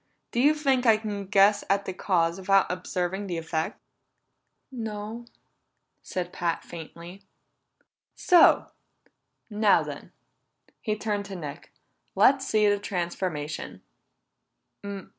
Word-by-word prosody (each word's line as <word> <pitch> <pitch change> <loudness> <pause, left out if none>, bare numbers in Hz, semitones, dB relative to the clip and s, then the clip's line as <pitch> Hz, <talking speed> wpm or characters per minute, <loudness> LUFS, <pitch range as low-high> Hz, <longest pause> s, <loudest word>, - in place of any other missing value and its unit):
Do 235 - -1
you 290 +4 +5
think 270 -4 +1
I 220 -1 +6
can 205 -3 -5
guess 200 +1 +4
at 200 0 +1
the 190 - -4
cause 170 -2 0
without 195 0 +3
observing 180 +2 -3
the 175 -2 -3
effect?" 160 -1 -3 0.9
"No," 225 -1 -6 0.7
said 180 -1 -5
Pat 170 -1 -2
faintly. 170 +3 -10 0.9
"So! 355 -1 +5 0.8
Now 210 -1 +4
then," - - -8 0.7
he 215 -2 -1
turned 210 -1 -2
to 195 -1 -7
Nick, 150 -5 -8 0.4
"Let's 275 0 +4
see 215 -1 +3
this 205 0 +2
transformation." 170 -5 -4
200 Hz, 110 wpm, -26 LUFS, 175-215 Hz, 0.9 s, I